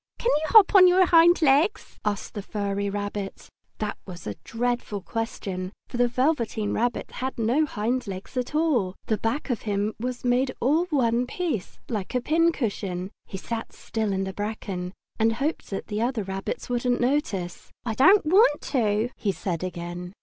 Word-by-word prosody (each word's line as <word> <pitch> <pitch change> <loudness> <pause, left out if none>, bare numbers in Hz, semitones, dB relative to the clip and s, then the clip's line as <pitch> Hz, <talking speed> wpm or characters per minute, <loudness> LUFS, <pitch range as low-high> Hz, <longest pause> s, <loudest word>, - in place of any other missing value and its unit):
"Can 480 - +1
you 315 - -3
hop 430 0 +7
on 375 -2 +9
your 365 +1 +5
hind 340 0 +6
legs?" 305 +9 +2
asked 210 -1 -2
the 205 - -4
furry 200 0 -2
rabbit. 205 -1 -5 0.3
That 210 -1 -3
was 175 -2 -9
a 105 - -3
dreadful 235 -3 -2
question, 195 -4 -4 0.2
for - - -5
the 245 0 +4
Velveteen 240 -5 0
Rabbit 240 +2 -1
had 260 +1 -4
no 245 +7 +2
hind 240 +1 -1
legs 190 +5 -7
at 250 +3 -2
all! 255 - +1
The 215 -2 0
back 245 +6 -1
of 235 - -2
him 205 0 -1
was 250 +1 -4
made 255 +1 +2
all 305 +8 +2
in 320 -5 -1
one 240 -1 +2
piece, 305 - -3
like 215 0 -4
a - - +3
pincushion. 225 - 0 0.2
He 190 - -6
sat 225 +4 -5
still 220 -2 -3
in 190 0 0
the 190 0 -4
bracken, 195 -3 -4 0.3
and 225 +1 +3
hoped 280 +7 -2
that 195 - -4
the 210 0 -3
other 240 -2 0
rabbits 195 0 -4
wouldn't 245 0 0
notice. 245 - -1 0.2
"I 225 - -1
don't 375 - +6
want 360 -2 +5
to!" 225 -2 0
he 205 - 0
said 180 -3 -3
again. 175 0 -5
230 Hz, 180 wpm, -25 LUFS, 200-270 Hz, 0.3 s, on